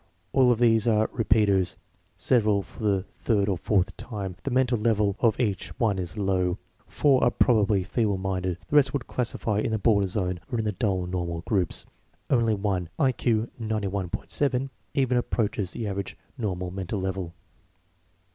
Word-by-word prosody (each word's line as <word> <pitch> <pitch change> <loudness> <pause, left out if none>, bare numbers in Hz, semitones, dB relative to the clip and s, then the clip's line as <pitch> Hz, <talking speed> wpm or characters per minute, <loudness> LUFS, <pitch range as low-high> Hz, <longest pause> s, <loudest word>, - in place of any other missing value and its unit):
All 130 -2 +5
of 120 - +2
these 115 -1 +3
are 110 -1 +2
repeaters, 105 -5 +2 0.4
several 105 -5 +2
for - - -14
the 100 -3 +1
third 100 -4 0
or 100 - +1
fourth 95 +1 0
time. 100 -6 -5
The - - -3
mental 125 -2 +2
level 105 -3 +2
of 115 -2 +2
each 105 -7 -1
one 105 -5 +1
is 90 +3 -4
low. 95 -2 +1 0.3
Four 140 -3 +3
are 120 - +5
probably 105 -5 +3
feeble 105 +1 0
minded, 95 -2 -2
the 150 - +3
rest 145 - +4
would 140 -3 -2
classify 115 -3 -1
in - - 0
the 110 - 0
border 100 -2 +3
zone 90 -2 -2
or 120 - 0
in 110 - -1
the 105 - +1
dull 95 -4 -1
normal 85 -2 -3
groups. 95 -3 -1 0.5
Only 115 -4 +3
one 95 -4 -1
(I 135 -4 +3
Q 115 -2 0
91.7) 110 +6 -1 0.2
even 130 -3 +2
approaches 105 -5 -1
the 115 - -4
average 100 -1 -4 0.2
normal 90 -7 -3
mental 95 +2 -4
level." 95 -2 -3
105 Hz, 165 wpm, -26 LUFS, 95-115 Hz, 0.5 s, All